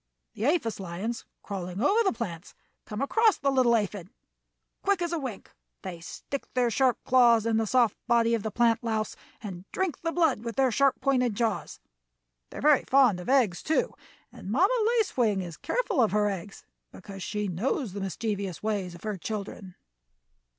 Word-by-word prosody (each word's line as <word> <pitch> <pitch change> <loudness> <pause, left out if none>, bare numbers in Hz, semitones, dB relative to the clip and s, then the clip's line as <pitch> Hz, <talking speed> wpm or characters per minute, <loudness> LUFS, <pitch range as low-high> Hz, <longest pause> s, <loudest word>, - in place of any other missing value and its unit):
The 220 - -3
aphis 290 -10 0
lions 195 +6 -4 0.2
crawling 185 -2 -5
over 405 - +3
the 390 - +2
plants 195 -7 -6 0.3
come 210 +5 -3
across 445 +9 +3
the 275 0 +1
little 255 -3 +4
aphid. 205 -4 -2 0.7
Quick 400 -2 +1
as 345 -1 -2
a 335 - 0
wink 255 -8 -7 0.3
they 180 -3 -6
stick 270 +10 -7
their 245 -2 +2
sharp 260 0 +2
claws 235 -3 +5
in 225 -1 +2
the 220 -1 0
soft 240 -2 +3
body 235 -1 +3
of 230 - +1
the 220 - -3
plant 230 +1 +2
louse 220 -2 -2 0.3
and 185 -4 -7
drink 375 -5 -2
the 330 - -1
blood 330 -10 +1
with 230 -1 -5
their 265 -2 +3
sharp 275 +3 +2
pointed 250 -5 +1
jaws. 225 -1 -2 0.7
They - - -10
are - - -5
very 295 -1 +5
fond 255 -8 +4
of 180 - -7
eggs, 240 -10 +3
too, 315 - 0 0.4
and - - -10
Mamma 365 - +3 0.2
Lace 440 -3 0
Wing 215 -6 +2
is 170 -3 -7
careful 460 - 0
of 220 - +2
her 210 0 +3
eggs, 195 +1 -8 0.3
because 195 +1 -10
she 210 +2 -2
knows 200 - -2
the 200 - -5
mischievous 195 -1 -3
ways 200 -5 -2
of 175 - -14
her 215 -2 -3
children." 200 -2 -6
225 Hz, 185 wpm, -27 LUFS, 200-265 Hz, 0.7 s, claws